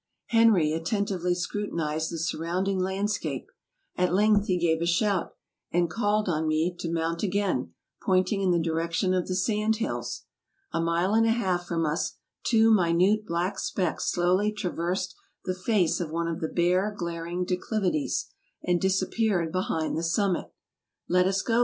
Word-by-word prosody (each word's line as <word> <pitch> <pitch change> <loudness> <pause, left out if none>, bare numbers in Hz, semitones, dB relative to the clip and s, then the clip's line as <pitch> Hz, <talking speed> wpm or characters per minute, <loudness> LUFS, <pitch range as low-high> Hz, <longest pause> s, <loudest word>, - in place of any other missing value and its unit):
Henry 220 -10 +4
attentively 180 +1 -1
scrutinized 165 -5 -2
the 165 - -4
surrounding 175 +4 -1
land 190 +3 0
scape; 155 -9 -3 0.5
at 180 -1 +1
length 205 +2 +3
he 185 - +2
gave 165 -2 +1
a 170 - 0
shout, 190 +2 +1 0.4
and 175 -1 +1
called 210 0 +1
on 160 -2 0
me 160 +3 +1
to 165 - -3
mount 165 0 -1
again, 185 - -1 0.3
pointing 185 +1 +2
in 190 - +2
the 175 - +3
direction 165 +2 0
of 180 -1 0
the 185 - -2
sand 215 +3 +1
hills. 225 +1 -3 0.5
A - - +1
mile 170 +4 +1
and 225 +1 +4
a - - +4
half 185 -6 0
from 165 -1 0
us 155 +2 -2 0.3
two 225 -1 +4
minute 190 +3 +3
black 175 +3 -1
specks 180 -5 -1
slowly 185 +4 +2
traversed 180 -2 -2 0.3
the 185 - 0
face 185 -2 +1
of 170 -3 -3
one 165 +1 -2
of 165 -1 -3
the 160 - -1
bare, 180 +4 +2
glaring 170 0 -3
declivities, 180 -3 -1 0.3
and 175 -1 +1
disappeared 190 -2 +1
behind 165 -3 -1
the 160 - -1
summit. 180 +2 0 0.6
"Let 180 +1 +3
us 195 0 0
go! 230 0 +2
180 Hz, 160 wpm, -27 LUFS, 170-200 Hz, 0.6 s, Henry